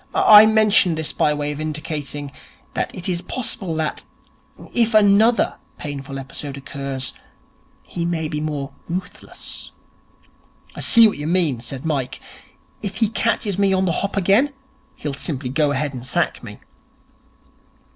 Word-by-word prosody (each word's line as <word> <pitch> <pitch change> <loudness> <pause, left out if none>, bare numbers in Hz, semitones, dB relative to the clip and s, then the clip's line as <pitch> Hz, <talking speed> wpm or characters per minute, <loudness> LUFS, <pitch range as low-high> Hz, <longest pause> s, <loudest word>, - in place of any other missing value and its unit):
I 215 0 +9
mention 215 -5 +4
this 160 -1 -3
by 150 - +2
way 145 0 -2
of 150 - -6
indicating 150 -2 -4 0.4
that - - -2
it 180 - -3
is 175 -2 -1
possible 190 -5 -3
that, 155 -1 -2 0.7
if 230 -2 +2
another 215 +3 +4 0.2
painful 140 -2 -6
episode 135 +1 -7
occurs, 135 -2 -4 0.7
he 170 - -5
may 165 -2 -1
be 150 -1 -3
more 145 -2 -4 0.2
ruthless.' 180 +2 -6 1.1
'I - - -6
see 230 -1 +7
what 205 - -3
you 150 - -3
mean,' 165 -8 +2
said 130 +3 -6
Mike. 140 -5 -2 0.6
'If 200 -2 -4
he 220 0 +1
catches 215 -3 -1
me 195 -1 +3
on 190 0 +2
the 175 - +1
hop 200 +4 -2
again, 200 +9 +3 0.4
he'll 145 -2 -4
simply 140 -2 -3
go 150 +2 +2
ahead 145 0 -1
and 125 -2 -7
sack 130 - -1
me.' - - -9
160 Hz, 145 wpm, -21 LUFS, 145-200 Hz, 1.1 s, I